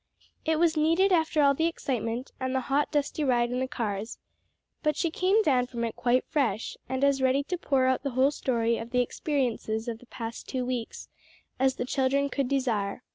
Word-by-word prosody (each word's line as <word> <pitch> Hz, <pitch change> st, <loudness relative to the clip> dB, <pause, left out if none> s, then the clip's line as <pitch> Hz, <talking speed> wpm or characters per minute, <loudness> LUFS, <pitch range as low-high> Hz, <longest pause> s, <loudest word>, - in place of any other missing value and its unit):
It 320 Hz, 0 st, +2 dB
was 335 Hz, 0 st, +3 dB
needed 330 Hz, +6 st, +3 dB
after 320 Hz, -3 st, +3 dB
all 280 Hz, 0 st, +5 dB
the 320 Hz, +4 st, +1 dB
excitement 250 Hz, -6 st, -3 dB
and 260 Hz, 0 st, -2 dB
the 260 Hz, -, +1 dB
hot 280 Hz, +3 st, 0 dB
dusty 295 Hz, 0 st, 0 dB
ride 240 Hz, -3 st, +2 dB
in 250 Hz, -, -1 dB
the 260 Hz, -, -1 dB
cars; 220 Hz, -5 st, -3 dB, 0.6 s
but 300 Hz, -2 st, +1 dB
she 335 Hz, +2 st, 0 dB
came 385 Hz, +6 st, +2 dB
down 255 Hz, -7 st, +2 dB
from 235 Hz, -2 st, -4 dB
it 230 Hz, -, -2 dB
quite 250 Hz, +1 st, +1 dB
fresh, 250 Hz, -9 st, -1 dB
and 260 Hz, +1 st, -1 dB
as 280 Hz, -1 st, +3 dB
ready 265 Hz, +2 st, +3 dB
to 360 Hz, +5 st, -3 dB
pour 270 Hz, -5 st, +2 dB
out 260 Hz, 0 st, +2 dB
the 280 Hz, -, -2 dB
whole 270 Hz, +2 st, +5 dB
story 235 Hz, -5 st, 0 dB
of 230 Hz, -, -7 dB
the 250 Hz, 0 st, +2 dB
experiences 245 Hz, -4 st, -2 dB
of 230 Hz, -1 st, -4 dB
the 250 Hz, -, -18 dB
past 230 Hz, -1 st, -7 dB
two 255 Hz, -1 st, -2 dB
weeks 245 Hz, -2 st, -4 dB, 0.5 s
as 265 Hz, 0 st, +3 dB
the 245 Hz, -, -3 dB
children 275 Hz, +2 st, +1 dB
could 275 Hz, -1 st, -1 dB
desire. 250 Hz, -6 st, -1 dB
260 Hz, 205 wpm, -28 LUFS, 240-290 Hz, 0.6 s, all